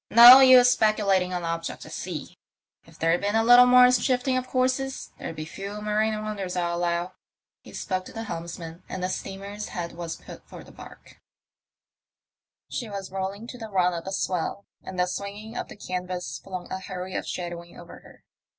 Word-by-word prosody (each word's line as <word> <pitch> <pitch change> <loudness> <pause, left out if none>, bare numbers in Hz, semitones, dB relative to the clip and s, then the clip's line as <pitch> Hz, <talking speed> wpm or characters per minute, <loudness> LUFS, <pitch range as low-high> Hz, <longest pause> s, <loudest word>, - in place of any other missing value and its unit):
"No 240 +3 +11
use 255 -2 +8
speculating 200 -5 +2
on 180 -1 -3
objects 165 0 -4
at - - -12
sea. - - -6 0.5
If - - -18
there'd 165 +2 +1
been 205 +1 -1
a 225 - +3
little 245 +2 +8
more 250 0 +7
shifting 255 +1 +1
of 255 0 -2
courses 255 +1 -1
there'd - - -6
be 155 - -6
fewer 200 +5 -7
marine 215 +1 0
wonders, 200 -4 -4
I 175 -1 0
allow." 175 +1 -1 0.5
He - - -14
spoke 185 -2 -3
to - - -10
the 225 - -6
helms 170 -5 -6
man, 165 0 -9
and 185 - -5
the 185 - -1
steamer's 200 +2 -6
head 170 -1 -5
was 170 -1 -6
put - - -12
for - - -11
the - - -15
barque. - - -14 1.5
She 235 -4 -5
was 195 -2 -6
rolling 195 +3 -4
to 250 - -9
the 225 -1 -7
run 180 -3 +2
of 170 -1 -5
the 190 - -5
swell, 185 +1 -2 0.2
and 190 - -9
the 180 - +3
swinging 200 +4 -6
of - - -4
the - - -11
canvas 180 -2 -5
flung 185 -2 -7
a 190 - -3
hurry 185 0 -7
of - - -3
shadowing 175 -1 -6
over - - -12
her. - - -18
195 Hz, 195 wpm, -25 LUFS, 180-220 Hz, 1.5 s, No